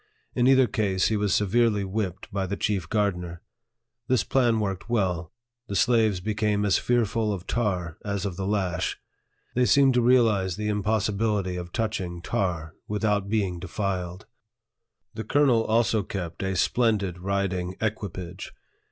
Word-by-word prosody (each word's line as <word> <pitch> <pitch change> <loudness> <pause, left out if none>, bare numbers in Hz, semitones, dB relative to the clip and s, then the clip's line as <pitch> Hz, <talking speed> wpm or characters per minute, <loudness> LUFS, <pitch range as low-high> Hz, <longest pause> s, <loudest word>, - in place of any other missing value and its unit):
In 120 - +2
either 130 -1 +6
case, 105 -7 +1
he 110 - +1
was 105 -1 0
severely 105 +1 +2
whipped 95 -1 -4
by 95 -1 -1
the 100 +2 -3
chief 95 -6 -1
gardener. 90 -5 -1 0.6
This 130 -1 +2
plan 120 -4 +2
worked 100 0 -3
well; 90 -8 0 0.4
the 100 - -4
slaves 110 -2 +3
became 105 +1 0
as 100 - +3
fearful 115 -2 +1
of 95 -3 -4
tar 90 -8 -2
as 100 -2 -2
of 95 -3 -3
the 95 +1 -3
lash. 95 -4 -1 0.6
They 125 0 +3
seemed 135 -2 +5
to 125 - +3
realize 110 -7 +3
the 105 +1 -3
impossibility 105 -2 0
of 90 -1 -6
touching 95 -6 -2
tar 85 -4 -2
without 105 -1 0
being 100 -5 0
defiled. 95 0 -3 0.9
The 110 0 -5
colonel 125 -1 +3
also 110 -1 +2
kept 90 -4 -5
a 95 0 -1
splendid 100 -2 +1
riding 95 -1 -2
equipage. 95 -4 -4
100 Hz, 145 wpm, -26 LUFS, 95-110 Hz, 0.9 s, either